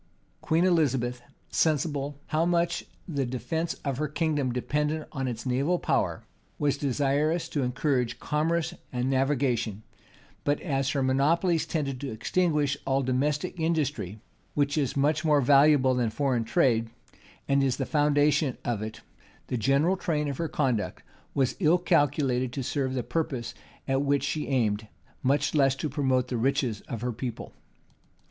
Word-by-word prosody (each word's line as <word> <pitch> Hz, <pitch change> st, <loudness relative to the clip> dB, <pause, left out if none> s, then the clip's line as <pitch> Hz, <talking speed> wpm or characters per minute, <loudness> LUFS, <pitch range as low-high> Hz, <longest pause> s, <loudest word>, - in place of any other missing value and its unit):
Queen 165 Hz, +3 st, +2 dB
Elizabeth, 130 Hz, -8 st, +1 dB, 0.3 s
sensible 145 Hz, -2 st, 0 dB
how 155 Hz, +1 st, +2 dB
much 170 Hz, 0 st, +1 dB, 0.2 s
the 145 Hz, -6 st, -1 dB
defence 160 Hz, +7 st, -2 dB
of 135 Hz, -2 st, -1 dB
her 150 Hz, -, 0 dB
kingdom 150 Hz, -4 st, 0 dB
depended 150 Hz, +5 st, -1 dB
on 135 Hz, -3 st, -3 dB
its 120 Hz, -1 st, -4 dB
naval 135 Hz, +8 st, +1 dB
power, -, -, 0 dB, 0.3 s
was 145 Hz, -2 st, +1 dB
desirous 145 Hz, +4 st, 0 dB
to 150 Hz, -, -2 dB
encourage 125 Hz, -1 st, 0 dB
commerce 160 Hz, +2 st, 0 dB, 0.2 s
and 125 Hz, +1 st, -1 dB
navigation: 130 Hz, -6 st, 0 dB, 0.6 s
but 145 Hz, 0 st, +1 dB
as 135 Hz, -5 st, 0 dB
her 140 Hz, -1 st, 0 dB
monopolies 160 Hz, +6 st, +2 dB
tended 140 Hz, -5 st, -2 dB
to 140 Hz, -, -3 dB
extinguish 145 Hz, +4 st, +1 dB
all 135 Hz, 0 st, +2 dB
domestic 145 Hz, +7 st, -1 dB
industry, 150 Hz, -, -1 dB, 0.4 s
which 145 Hz, -1 st, +1 dB
is 140 Hz, -3 st, 0 dB
much 150 Hz, +3 st, +2 dB
more 150 Hz, -2 st, +4 dB
valuable 140 Hz, 0 st, +5 dB
than 125 Hz, -3 st, +1 dB
foreign 130 Hz, -1 st, 0 dB
trade, 115 Hz, -4 st, +2 dB, 0.6 s
and 140 Hz, 0 st, +3 dB
is 130 Hz, -2 st, +1 dB
the 135 Hz, -, -1 dB
foundation 145 Hz, -2 st, +2 dB
of 115 Hz, -4 st, -1 dB
it, 110 Hz, 0 st, -6 dB, 0.5 s
the -, -, -1 dB
general 140 Hz, -, +2 dB
train 150 Hz, -5 st, -1 dB
of 140 Hz, -2 st, -3 dB
her 165 Hz, -, 0 dB
conduct 130 Hz, -8 st, -1 dB, 0.3 s
was 130 Hz, -2 st, +1 dB
ill 170 Hz, -1 st, +4 dB
calculated 140 Hz, -7 st, +1 dB
to 135 Hz, +1 st, -4 dB
serve 130 Hz, 0 st, -1 dB
the 125 Hz, -, -1 dB
purpose 125 Hz, -7 st, -2 dB, 0.3 s
at 135 Hz, 0 st, +1 dB
which 140 Hz, 0 st, +1 dB
she 155 Hz, -, -2 dB
aimed, 110 Hz, -5 st, 0 dB, 0.3 s
much 145 Hz, +2 st, +1 dB
less 135 Hz, -3 st, +3 dB
to 155 Hz, -, -3 dB
promote 130 Hz, -3 st, +1 dB
the 125 Hz, -, -2 dB
riches 125 Hz, -3 st, 0 dB
of 115 Hz, -4 st, -5 dB
her 125 Hz, 0 st, -1 dB
people. 120 Hz, +1 st, -6 dB
140 Hz, 155 wpm, -27 LUFS, 130-150 Hz, 0.6 s, valuable